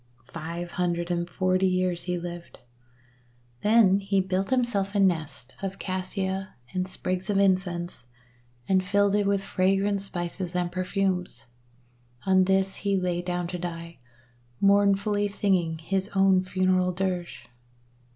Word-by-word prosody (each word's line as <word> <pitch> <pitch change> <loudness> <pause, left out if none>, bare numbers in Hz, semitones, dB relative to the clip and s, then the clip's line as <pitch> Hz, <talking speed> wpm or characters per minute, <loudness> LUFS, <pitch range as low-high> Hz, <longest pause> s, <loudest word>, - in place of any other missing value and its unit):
Five 170 +2 -5
hundred 175 -1 -1
and 175 0 -1
forty 185 0 +1
years 185 -2 0
he 180 0 -1
lived, 175 0 -8 1.0
then 210 -3 +5
he 195 0 +1
built 190 +1 -1
himself 230 -6 0
a - - +3
nest 160 -9 0
of 195 0 -4
Cassia 190 0 -3 0.2
and 185 0 -1
sprigs 185 +1 -3
of 200 - +2
Incense, 185 -6 0 0.6
and 185 -1 +3
filled 200 +1 +2
it 205 -1 +2
with 200 -1 +1
fragrant 195 +1 +1
spices 180 -1 -4
and 175 -1 0
perfumes. 185 0 -1 0.8
On 190 -1 +4
these 190 0 +1
he 200 -1 0
lay 180 -1 -1
down 180 0 -2
to 180 - -4
die, 170 -1 -6 0.6
mourn 200 0 +5
fully 205 +1 0
singing 185 -5 0
his 190 +4 -2
own 195 -1 +4
funeral 185 0 +1
dirge. 175 -8 -3
185 Hz, 135 wpm, -26 LUFS, 175-195 Hz, 1.0 s, then